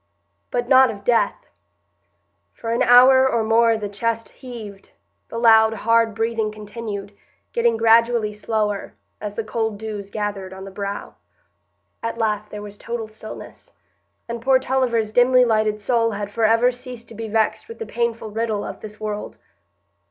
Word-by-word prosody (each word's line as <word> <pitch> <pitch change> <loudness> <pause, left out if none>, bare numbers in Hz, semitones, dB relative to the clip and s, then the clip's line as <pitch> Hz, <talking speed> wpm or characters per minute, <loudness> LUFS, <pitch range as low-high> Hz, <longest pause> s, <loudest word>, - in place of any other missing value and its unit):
But 245 -1 -2
not 260 0 +6
of 200 -3 -7
death. 235 -2 +1 1.1
For 230 - -5
an 235 - 0
hour 260 +2 +7
or 230 -3 +1
more 225 +1 +3
the 210 -1 -4
chest 230 +3 -2
heaved, 220 -6 -10 0.4
the - - -6
loud, 225 -1 +6
hard 230 0 +2
breathing 225 -1 -1
continued, 210 -1 -7 0.4
getting 235 -1 +2
gradually 230 -1 +3
slower, 210 -1 -2 0.3
as 205 -1 -5
the 225 - -2
cold 220 -1 -2
dews 210 -2 -6
gathered 200 -3 -4
on 190 0 -9
the 195 - -9
brow. 200 +1 -5 0.8
At 230 0 -3
last 215 -2 -1
there 210 0 -7
was 205 0 -10
total 235 -1 -4
stillness, 215 0 -11 0.5
and 235 0 -5
poor 265 +2 +4
Tulliver's 250 -4 0
dimly 250 +2 +5
lighted 215 -2 +1
soul 230 +1 +1
had 205 0 -4
forever 230 +3 +3
ceased 245 -2 -10
to - - -10
be 225 +1 -6
vexed 220 - 0
with 460 - -9
the 455 - -5
painful 230 - -2
riddle 220 -1 -1
of - - -7
this 215 0 -10
world. 210 -1 -5
225 Hz, 160 wpm, -22 LUFS, 210-235 Hz, 1.1 s, hour